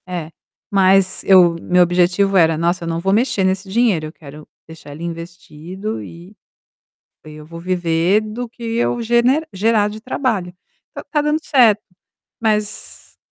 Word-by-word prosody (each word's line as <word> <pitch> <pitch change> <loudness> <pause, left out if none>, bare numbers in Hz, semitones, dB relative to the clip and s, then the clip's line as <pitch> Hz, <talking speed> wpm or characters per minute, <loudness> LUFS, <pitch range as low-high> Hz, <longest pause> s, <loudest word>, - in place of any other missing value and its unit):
É, 170 -3 -5 0.4
mas 195 -1 +3
eu 180 -3 +6
meu 180 0 +3
objetivo 180 +3 +1
era: 165 -2 +3
"Nossa, 170 +2 -1
eu - - -5
não 165 0 -2
vou 190 +3 0
mexer 215 -3 +1
nesse 190 +1 -1
dinheiro, 200 -7 +1
eu 155 - -11
quero 150 -1 -13 0.2
deixar 160 -2 -12
ele 155 +4 -9
investido 170 +4 -7
e 175 +5 -12 0.9
aí 155 -1 -11
eu 150 0 -12
vou 165 +1 -10
viver 175 +2 +1
do 220 +3 -6
que 235 +1 -16
eu 240 0 0
gene 240 +6 +2
gerar 210 +1 +1
de 215 +1 -8
trabalho". 215 -7 -2 0.4
Então - - -9
tá 300 -2 +1
dando 300 +1 0
certo, 230 -9 +3 0.6
mas 215 -2 -3
190 Hz, 160 wpm, -18 LUFS, 170-215 Hz, 0.9 s, eu